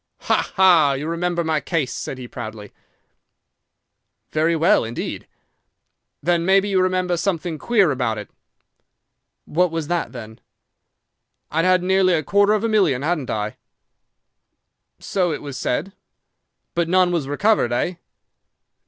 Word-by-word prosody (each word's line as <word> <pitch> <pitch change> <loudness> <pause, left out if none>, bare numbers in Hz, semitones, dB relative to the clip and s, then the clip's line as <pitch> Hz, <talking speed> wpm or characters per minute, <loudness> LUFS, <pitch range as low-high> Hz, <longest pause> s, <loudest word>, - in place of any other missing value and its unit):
"'"Ha, - - 0
ha! 175 -7 +5
You 140 +3 -4
remember 170 +1 -1
my 160 -1 0
case!" 160 -8 -2
said 135 - -5
he 125 -1 -8
proudly. 110 -4 -8 1.6
"'"Very 160 +2 +1
well, 165 +1 +3
indeed." 115 +1 -5 1.0
"'"Then 170 -1 +2
maybe 195 +2 +3
you 190 -2 +2
remember 185 -1 +1
something 170 -3 -2
queer 205 -9 +3
about 125 -5 -1
it?" 105 - -7 1.2
"'"What 180 +3 +1
was 165 -2 -4
that, 175 -1 -1
then?" 110 -3 -10 1.1
"'"I'd 165 +3 +1
had 185 -1 +3
nearly 190 0 +3
a 155 - -1
quarter 200 +6 +3
of 215 0 0
a - - +2
million, 185 - +2
hadn't 155 -4 -1
I?" 105 0 -3 1.4
"'"So 180 -3 -1
it 150 - -5
was 140 -2 -7
said." 190 +12 -2 0.8
"'"But 170 -1 0
none 185 0 +3
was 165 -6 -1
recovered, 145 - +1
eh?" 170 +9 -1
170 Hz, 135 wpm, -21 LUFS, 140-185 Hz, 1.6 s, ha